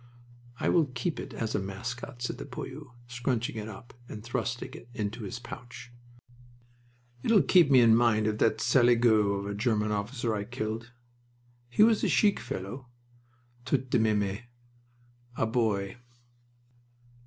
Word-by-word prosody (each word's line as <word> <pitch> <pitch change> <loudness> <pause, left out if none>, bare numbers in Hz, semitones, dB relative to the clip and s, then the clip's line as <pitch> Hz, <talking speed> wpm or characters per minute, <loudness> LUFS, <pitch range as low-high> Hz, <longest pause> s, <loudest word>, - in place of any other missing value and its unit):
"I - - -1
will 165 -4 +3
keep 130 +6 -3
it - - -7
as 115 -1 -3
a - - +1
mascot," 120 +6 -6
said 120 - -3
the - - -6
poilu, 135 +1 -8 0.2
scrunching 120 -1 -2
it 110 0 -5
up 110 +3 -11 0.2
and 105 - -8
thrusting 120 +1 -3
it 120 - -12
into 110 -1 -3
his 100 - -5
pouch. 120 -1 -10 1.3
"It'll 210 - +4
keep 170 +1 +5
me 130 -3 +7
in 115 -1 +6
mind 115 -2 +3
of 110 0 -1
that 110 - +2
saligaud 120 -4 +4
of - - -6
a 100 - -3
German 105 0 0
officer 115 +3 -2
I 105 -1 -2
killed. 115 0 -4 0.8
He 205 - +4
was 220 -1 +4
a - - +3
chic 205 -2 +3
fellow, 110 +8 -6 0.8
tout 130 0 -1
de 125 - +4
meme. 105 -2 +1 1.0
A - - +1
boy." 110 -3 0
115 Hz, 150 wpm, -29 LUFS, 110-125 Hz, 1.3 s, me